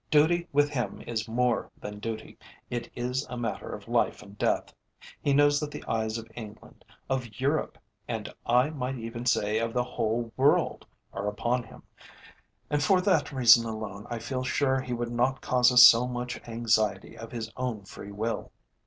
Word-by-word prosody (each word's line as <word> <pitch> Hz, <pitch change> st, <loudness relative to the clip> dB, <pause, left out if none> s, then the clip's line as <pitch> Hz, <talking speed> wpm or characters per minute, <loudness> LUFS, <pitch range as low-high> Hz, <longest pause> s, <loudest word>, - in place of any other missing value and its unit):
Duty 170 Hz, +3 st, +3 dB
with 145 Hz, +1 st, +3 dB
him 125 Hz, -5 st, -3 dB
is 110 Hz, -2 st, -3 dB
more 120 Hz, +1 st, 0 dB
than 105 Hz, 0 st, -7 dB
duty, 110 Hz, 0 st, -6 dB, 0.4 s
it 120 Hz, -1 st, -3 dB
is 125 Hz, +2 st, -1 dB
a 125 Hz, -, -5 dB
matter 115 Hz, -4 st, -3 dB
of -, -, -8 dB
life -, -, 0 dB
and 100 Hz, 0 st, -14 dB
death; -, -, 0 dB, 0.5 s
he 145 Hz, -, +1 dB
knows 145 Hz, +1 st, +4 dB
that 150 Hz, -, -3 dB
the -, -, -8 dB
eyes 110 Hz, 0 st, -1 dB
of 115 Hz, 0 st, -8 dB
England, 110 Hz, -2 st, -11 dB, 0.2 s
of 125 Hz, -5 st, -3 dB
Europe, 140 Hz, +4 st, 0 dB, 0.3 s
and 110 Hz, -3 st, -3 dB, 0.2 s
I 125 Hz, +5 st, +3 dB
might 135 Hz, -3 st, -3 dB
even 115 Hz, +1 st, -6 dB
say 105 Hz, -3 st, +2 dB
of 115 Hz, 0 st, -2 dB
the 125 Hz, -, +1 dB
whole 115 Hz, -1 st, -2 dB
world, 140 Hz, +3 st, +2 dB, 0.3 s
are 100 Hz, -, -3 dB
upon 120 Hz, +4 st, 0 dB
him, 115 Hz, -, -14 dB, 0.9 s
and 145 Hz, 0 st, +2 dB
for 185 Hz, +5 st, +4 dB
that 180 Hz, -7 st, +2 dB
reason 120 Hz, -3 st, +7 dB
alone 110 Hz, -2 st, -6 dB
I 120 Hz, -, -3 dB
feel 130 Hz, +3 st, -3 dB
sure 130 Hz, 0 st, +1 dB
he 125 Hz, -1 st, -4 dB
would 120 Hz, 0 st, -3 dB
not 125 Hz, +3 st, +1 dB
cause 125 Hz, 0 st, +3 dB
us 125 Hz, 0 st, +9 dB
so 120 Hz, +2 st, +7 dB
much 125 Hz, 0 st, -4 dB
anxiety 115 Hz, -1 st, 0 dB
of 115 Hz, 0 st, -9 dB
his 115 Hz, -2 st, -5 dB
own 125 Hz, -5 st, -3 dB
free 100 Hz, +1 st, -10 dB
will." 110 Hz, +3 st, -3 dB
120 Hz, 180 wpm, -28 LUFS, 115-130 Hz, 0.9 s, us